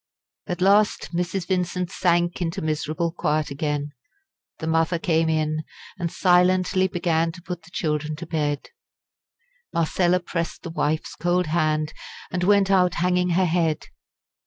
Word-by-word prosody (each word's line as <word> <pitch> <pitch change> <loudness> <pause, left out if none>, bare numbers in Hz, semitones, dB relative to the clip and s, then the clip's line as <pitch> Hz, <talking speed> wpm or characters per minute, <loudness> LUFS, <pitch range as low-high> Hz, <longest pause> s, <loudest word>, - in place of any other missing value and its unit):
At 180 -2 -3
last 200 0 +3
Mrs. 180 +1 -1
Vincent 180 -1 -1
sank 175 -1 +1
into 175 +2 -2
miserable 155 +2 -1
quiet 155 -3 -1
again. 145 0 -2 0.7
The - - -6
mother 165 +1 +2
came 165 -1 +1
in, 155 0 0 0.4
and 170 -2 -2
silently 185 +1 +3
began 170 -2 0
to 175 - -12
put 180 -1 -5
the 165 - -17
children 155 -3 -2
to 155 - -7
bed. 150 -3 -2 1.0
Marcella 175 +2 +2
pressed 170 -1 -4
the 170 - -6
wife's 155 -1 -1
cold 175 +3 +1
hand, 155 -1 0 0.4
and 180 -1 -1
went 200 0 +4
out 180 -2 +4
hanging 180 +1 +1
her 190 - +4
head. 165 -2 0
170 Hz, 140 wpm, -24 LUFS, 155-180 Hz, 1.0 s, went